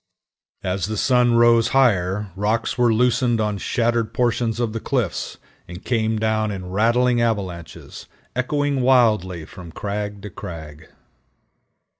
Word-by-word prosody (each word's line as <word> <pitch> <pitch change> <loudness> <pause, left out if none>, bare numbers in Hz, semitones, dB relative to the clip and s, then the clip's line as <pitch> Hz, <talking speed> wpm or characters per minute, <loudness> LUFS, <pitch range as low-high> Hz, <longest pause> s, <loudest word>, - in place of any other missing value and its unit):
As 95 +1 -2
the 110 0 -4
sun 125 0 +3
rose 115 -1 +5
higher 100 -5 +2
rocks 110 +3 -1
were 120 -2 +3
loosened 120 0 +2
on 105 -2 -1
shattered 115 0 -1
portions 120 -2 0
of 115 -3 -1
the 115 - -3
cliffs, 120 - -2 0.3
and 90 +1 -10
came 110 -2 0
down 110 0 0
in 90 -3 -6
rattling 120 +4 +2
avalanches, 95 -8 -4 0.3
echoing 140 +1 0
wildly 105 -10 +2
from 85 +1 -11
crag 105 +2 -5
to 105 - -7
crag. 80 -5 -9
110 Hz, 130 wpm, -21 LUFS, 95-120 Hz, 0.3 s, rose